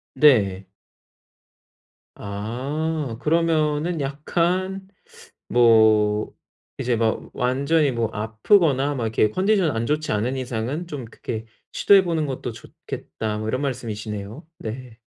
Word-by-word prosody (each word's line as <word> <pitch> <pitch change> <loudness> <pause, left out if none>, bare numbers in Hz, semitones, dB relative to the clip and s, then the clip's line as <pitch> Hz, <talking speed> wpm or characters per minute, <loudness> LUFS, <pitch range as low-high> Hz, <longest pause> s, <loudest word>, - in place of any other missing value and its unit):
네. 100 -10 +4 1.5
아 130 +7 -3
그러면은 160 0 +1
약간 180 +7 -1 0.6
뭐 110 -3 +4 0.4
이제 120 -1 0
막 110 -1 -1
완전히 140 +4 +2
뭐 115 -3 -1
"아프거나 135 - +2
막 125 - -2
이렇게 110 -1 +2
컨디션 190 - +2
안 115 +1 -1
좋지 155 +3 -1
않은 120 +6 -1
이상은 130 +7 -3
좀 145 -7 -6
그렇게 110 0 -6 0.3
시도해 200 -1 +5
보는 165 -3 0
것도 130 -3 -4
좋겠다." 105 -1 -6
뭐 110 - -4
이런 130 +4 -1
말씀이시네요. 110 - -5
네. 115 +1 -7
130 Hz, 235 characters per minute, -23 LUFS, 110-155 Hz, 1.5 s, 시도해